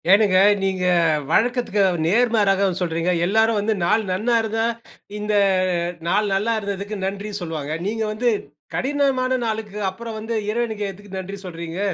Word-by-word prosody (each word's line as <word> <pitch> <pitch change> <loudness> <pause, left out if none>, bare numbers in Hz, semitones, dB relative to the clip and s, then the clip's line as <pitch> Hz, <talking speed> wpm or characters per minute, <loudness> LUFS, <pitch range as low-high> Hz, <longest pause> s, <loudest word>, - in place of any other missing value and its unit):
ஏனுங்க 195 -1 +5 0.2
நீங்க 190 -1 0 0.5
வழக்கத்துக்கு 240 -1 +2 0.2
நேர்மாறாக 200 -1 +3
சொல்றீங்க. 170 0 0
எல்லாரும் 220 +3 +3
வந்து 215 +2 +1
நாள் 215 +5 +2
நன்னா 220 +6 +1
இருந்தா 225 0 -1 0.5
இந்த 210 0 -2 0.7
நாள் 205 +3 +1
நல்லா 215 +4 +1
இருந்ததுக்கு 200 0 -4
நன்றி 200 +2 -4
சொல்வாங்க. 155 -3 -4
நீங்க 220 +1 -1
வந்து 240 +3 +1 0.5
கடினமான 265 -2 +1
நாளுக்கு 215 -2 -3
அப்புறம் 230 +2 -7
வந்து 225 +1 -4 0.2
இறைவனுக்கு 220 -2 -2
எதுக்கு 195 0 -10
நன்றி 195 +2 -6
சொல்றீங்க. 170 0 -6
210 Hz, 130 wpm, -22 LUFS, 190-225 Hz, 0.7 s, ஏனுங்க